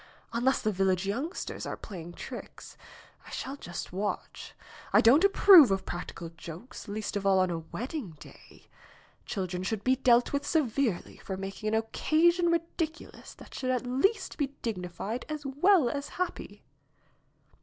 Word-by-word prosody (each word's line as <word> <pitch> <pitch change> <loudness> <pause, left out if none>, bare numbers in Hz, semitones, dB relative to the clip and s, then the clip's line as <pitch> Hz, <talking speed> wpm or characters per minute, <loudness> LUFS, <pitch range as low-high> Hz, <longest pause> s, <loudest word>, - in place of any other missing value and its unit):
Unless 245 +3 +1
the 215 - +2
village 190 -1 +1
youngsters 270 - -3
are - - -4
playing 175 -4 -9
tricks. - - -9 0.5
I - - -10
shall 270 +1 -5
just 175 -9 -7
watch. 205 +3 -4 0.4
I - - +6
don't 270 +10 +6
approve 390 - +8
of 195 -1 0
practical 170 -1 -6
jokes, 165 +7 -10
least 210 +1 -4
of 200 - -1
all 195 -1 +4
on 185 -1 +2
a 165 - -2
wed 220 +10 -6
ding 220 - -6
day. - - -15 0.6
Children 180 -2 -3
should 205 +2 -2
be 260 +1 +3
dealt 245 -1 +3
with 280 - 0
severely 265 - 0
for 190 - -6
making 195 +2 -5
an 215 - +1
occasion 325 +10 +2
ridiculous 330 -1 -3
that - - -14
should 255 - -3
at 255 0 0
least 380 - 0
be 285 - +2 0.2
dignified 200 +2 -4
as 305 -1 -5
well 300 +3 +4
as 280 +3 -3
happy." 365 0 -5
235 Hz, 155 wpm, -29 LUFS, 190-290 Hz, 0.6 s, approve